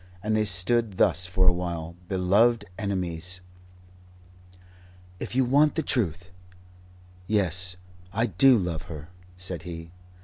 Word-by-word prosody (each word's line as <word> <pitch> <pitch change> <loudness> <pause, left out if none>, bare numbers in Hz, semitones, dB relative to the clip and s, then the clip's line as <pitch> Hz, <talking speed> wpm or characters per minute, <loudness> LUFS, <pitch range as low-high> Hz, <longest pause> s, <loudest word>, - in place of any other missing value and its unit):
And 110 +1 0
they 110 0 +2
stood 100 +2 +1
thus 90 0 +3
for 95 0 +1
a 90 - +6
while, 85 -2 -4
beloved 105 +4 +3
enemies. 90 -3 -3 1.8
"If - - -5
you 130 0 +3
want 145 +4 +4
the 160 - 0
Truth 90 - -1 1.0
yes, 95 -3 +1 0.4
I 115 +4 +1
do 120 +5 +5
love 85 -5 -2
her," 75 0 -8 0.3
said 90 -2 -4
he. 80 -1 -8
95 Hz, 125 wpm, -26 LUFS, 90-110 Hz, 1.8 s, a